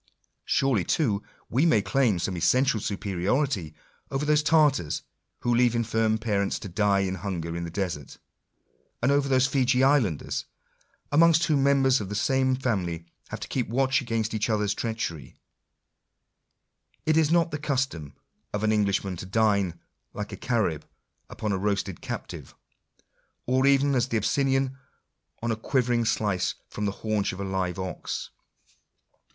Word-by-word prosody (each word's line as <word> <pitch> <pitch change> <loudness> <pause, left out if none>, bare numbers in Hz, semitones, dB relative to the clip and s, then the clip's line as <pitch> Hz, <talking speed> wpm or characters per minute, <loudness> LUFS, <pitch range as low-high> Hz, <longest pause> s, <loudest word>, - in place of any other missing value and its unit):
Surely 130 -9 +2
too 105 - +1 0.3
we 130 +6 +1
may 160 -10 +4
claim 120 -2 +2
some 90 +2 -2
essential 115 +9 +2
superiority 100 - -1 0.3
over 135 +2 -2
those 150 0 +3
Tartars 150 - +2 0.4
who 120 - +1
leave 120 0 +3
infirm 115 -1 +1
parents 105 -3 -1
to - - -7
die 100 +1 +2
of 95 -1 -2
hunger 85 -3 -4
in 85 0 -3
the - - -5
desert; 85 -6 -4 0.9
and 130 - +4
over 140 -1 +2
those 130 0 +4
Feejee 130 -1 +2
islanders, 130 - +1 0.7
amongst 165 +2 +5
whom 150 -4 +2
members 135 -2 +3
of 95 - -5
the 105 - -4
same 130 +4 +2
family 95 -10 -2 0.2
have - - -6
to - - -5
keep 125 -3 -2
watch 130 +3 +2
against 115 -3 -2
each 110 +1 -1
other's 105 -2 +1
treachery/ 110 - -4 1.7
It 155 - +3
is 160 -2 +4
not 170 0 +3
the 150 - -3
custom 130 - -2 0.4
of 105 0 -2
an 110 - +3
Englishman 100 -3 0
to 95 - -7
dine, 100 -5 +1 0.3
like 105 0 -5
a - - -5
Caxrib, 100 -11 0 0.5
upon 105 - -3
a 95 - 0
roasted 100 -3 -2
captive; - - -7 0.9
or 130 +2 +2
even 140 0 +4
as 125 -1 +2
the 115 - 0
Abyssinian, 135 +2 +1 0.6
on 115 - 0
a - - +1
quiver 125 +2 0
ing 120 -1 +1
slice 105 -5 0 0.2
from 105 - -3
the 100 - 0
haunch 110 -3 0
of - - -8
u 100 - -4
live 95 -2 -2
ox. 95 -2 -5
110 Hz, 155 wpm, -26 LUFS, 95-135 Hz, 1.7 s, amongst